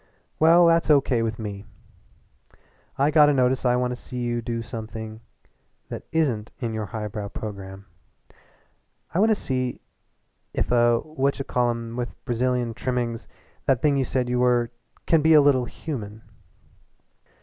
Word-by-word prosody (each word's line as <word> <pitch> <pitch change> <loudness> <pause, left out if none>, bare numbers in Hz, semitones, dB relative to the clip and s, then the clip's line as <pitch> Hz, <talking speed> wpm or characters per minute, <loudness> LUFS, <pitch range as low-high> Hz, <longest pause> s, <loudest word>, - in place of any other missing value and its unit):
"Well, 170 +2 +6
that's 165 -1 +3
O.K. 135 -5 +4
with 110 -1 -2
me. 100 -2 -6 1.3
I 140 +3 +3
got 150 -1 +6
a - - +3
notion 130 0 +2
I 125 - +3
want 125 0 0
to - - -3
see 125 +1 -9
you 120 -1 -1
do 115 0 -3
something 110 -1 -7 0.7
that - - -7
isn't 130 -10 0
in 115 -3 -3
your 110 -1 -3
highbrow 105 -1 -5
programme. 100 -2 -7 1.3
I 175 - +1
want 220 +3 +4
to 220 - +4
see 130 -8 -2 0.8
if - - -1
a 120 -1 +4
what 140 -3 -1
ch 135 - -5
call 125 -1 +1
em 115 -1 -4
with 120 -1 -4
Brazilian 125 -1 0
trimmings 120 -1 -3 0.4
that 130 -3 +2
thing 145 -2 +4
you 135 - +2
said 130 0 -1
you 125 0 0
were 120 -1 +2 0.3
can 165 -2 +4
be 160 +2 +5
a - - +9
little 135 -3 +3
human." 110 -6 -7
125 Hz, 160 wpm, -24 LUFS, 115-135 Hz, 1.3 s, a